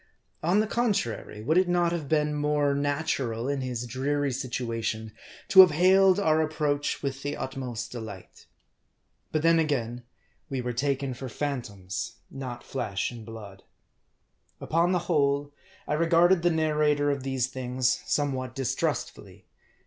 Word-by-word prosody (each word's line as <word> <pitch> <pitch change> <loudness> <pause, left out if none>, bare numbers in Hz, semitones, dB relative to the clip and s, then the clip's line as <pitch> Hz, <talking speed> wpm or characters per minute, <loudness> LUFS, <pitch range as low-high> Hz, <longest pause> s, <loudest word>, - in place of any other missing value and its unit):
On 180 +6 +3
the - - +1
contrary, 205 - -1
would 160 +9 +3
it 185 - +2
not 175 -1 +2
have 160 -5 -3
been 150 -1 +2
more 150 -1 +1
natural, 140 -5 -1
in 140 -1 -1
his 125 -2 -3
dreary 140 +3 -1
situation, 115 -4 -3 0.4
to 195 -3 +6
have 185 - +8
hailed 185 +4 +5
our 160 -5 +3
approach 150 -2 -1
with 135 -1 -3
the 145 0 -3
utmost 125 -3 -5
delight? 110 -6 -9 0.8
But 155 -1 0
then 165 0 +5
again, 125 -6 -1 0.5
we 135 -2 -2
were 125 0 -3
taken 135 +1 -1
for 130 +1 -7
phan 140 +1 -2
toms, 100 +2 -6 0.2
not 125 -3 -6
flesh 110 -7 -3
and 120 -2 -9
blood. 105 -3 -10 1.0
Upon 170 +3 +1
the 180 -2 0
whole, 145 -3 +1 0.3
I - - 0
regarded 170 +3 +4
the 175 - +3
narrator 150 -2 +2
of 140 -1 -2
these 130 -2 0
things 130 -1 -1
somewhat 130 -4 -1
distrustfully. 135 -5 -3
140 Hz, 145 wpm, -27 LUFS, 125-155 Hz, 1.0 s, have